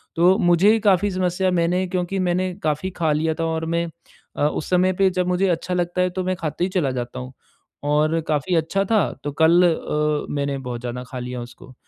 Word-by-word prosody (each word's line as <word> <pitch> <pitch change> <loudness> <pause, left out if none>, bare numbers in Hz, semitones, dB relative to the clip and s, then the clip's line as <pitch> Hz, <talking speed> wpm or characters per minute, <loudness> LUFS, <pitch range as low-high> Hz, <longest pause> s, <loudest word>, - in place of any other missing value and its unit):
तो 180 +4 +4
मुझे 175 +1 +4
ही 225 - +2
काफ़ी 200 -1 +3
समस्या 185 0 0
मैंने 180 +2 +1
क्योंकि 180 +1 -2
मैंने 185 0 0
काफ़ी 155 +4 -1
खा 160 -2 +2
लिया 160 +2 +1
था 165 - 0
और 160 0 -2
मैं 170 0 +1 0.5
अ, - - 0
उस 150 - -4
समय 185 +1 +3
पे 190 +1 +3
जब 180 -1 -1
मुझे 180 +2 +1
अच्छा 175 +1 -1
लगता 175 +1 0
है, 180 - +2
तो 185 +1 -3
मैं 185 0 -1
खाते 160 +1 -3
ही 185 - +1
चला 175 -7 0
जाता 120 0 -4
हूँ। 125 +1 -8 0.5
और 150 +2 +2
काफ़ी 155 +4 0
अच्छा 165 +5 +1
था 215 -3 +4 0.2
तो 145 - -3
कल 170 +2 +6
अ, 150 -1 -1
मैंने 140 -1 -1
बहुत 125 -3 -6
ज़्यादा 125 +1 -5
खा 130 - -5
लिया 125 0 -5
उसको। 120 +2 -12
170 Hz, 215 wpm, -22 LUFS, 150-185 Hz, 0.5 s, कल